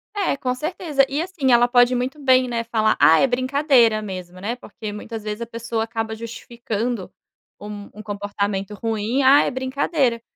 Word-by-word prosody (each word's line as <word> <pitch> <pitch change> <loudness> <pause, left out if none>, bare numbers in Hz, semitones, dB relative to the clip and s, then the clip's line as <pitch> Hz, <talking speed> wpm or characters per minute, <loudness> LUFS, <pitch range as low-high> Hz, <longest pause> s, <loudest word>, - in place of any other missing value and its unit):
Eh, 390 -8 0
com 250 -2 -1
certeza. 305 -2 0
E, 290 +3 -1
assim, 335 -8 -1
ela 240 0 +5
pode 245 0 +4
muito 260 +5 -3
bem, 260 -2 +4
né, 235 -1 -2
falar: 220 -2 +1
“Ah, 160 - +6
é 270 - +4
brincadeira 255 -3 +3
mesmo”, 185 -3 -7
né, 225 +5 -3
porque, 215 -3 -8
muitas 220 +1 -7
vezes, 210 +1 -5
a - - -2
pessoa 230 0 -3
acaba 225 -1 -4
justificando 230 -2 -5 0.5
um 205 0 -8
um 215 +1 -10
comportamento 205 -1 -3
ruim: 225 +4 -1
“Ah, 275 +2 +7
é - - -1
brincadeira”. 260 -1 0
235 Hz, 175 wpm, -22 LUFS, 215-260 Hz, 0.5 s, Ah